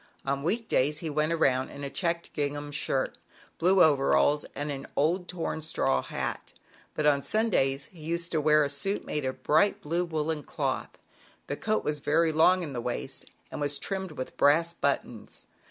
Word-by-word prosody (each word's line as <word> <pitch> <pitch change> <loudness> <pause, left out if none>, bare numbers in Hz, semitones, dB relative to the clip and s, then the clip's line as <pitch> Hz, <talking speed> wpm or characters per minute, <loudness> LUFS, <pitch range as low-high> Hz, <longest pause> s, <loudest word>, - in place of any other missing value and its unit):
On 140 0 -1
week 220 +9 -1
days 145 +3 +2
he 160 -1 -4
went 155 +2 +1
around 130 -6 +2
in 140 - -9
a 140 - -3
checked 170 -2 -2
ging 145 -1 -1
ham 145 0 -6
shirt, 135 -2 -1 0.4
blue 185 +2 +5
overalls 145 0 +3
and 145 +1 -3
an 140 -1 -6
old 175 +5 +1
torn 170 -2 -3
straw 105 - +1
hat; - - -4 0.4
but 155 - -1
on 145 -2 +4
Sundays 140 -11 +1
he 170 - -15
used 170 +2 -2
to 155 - +1
wear 150 0 +5
a - - +1
suit 195 +9 -1
made 150 -2 -2
of 130 - -4
bright 200 +7 +3
blue 170 +4 -1
woolen 160 -2 -2
cloth. - - -3 0.5
The 145 - -3
coat 215 +7 -1
was 150 0 -1
very 165 +3 +2
long 180 +4 +4
in 150 -4 -5
the 120 - -3
waist, 125 +3 -4 0.3
and - - -5
was 145 0 +1
trimmed 190 +2 -3
with 130 -3 -6
brass 165 +4 +4
but 140 -4 +1
tons. 115 -3 -10
150 Hz, 190 wpm, -28 LUFS, 140-170 Hz, 0.5 s, blue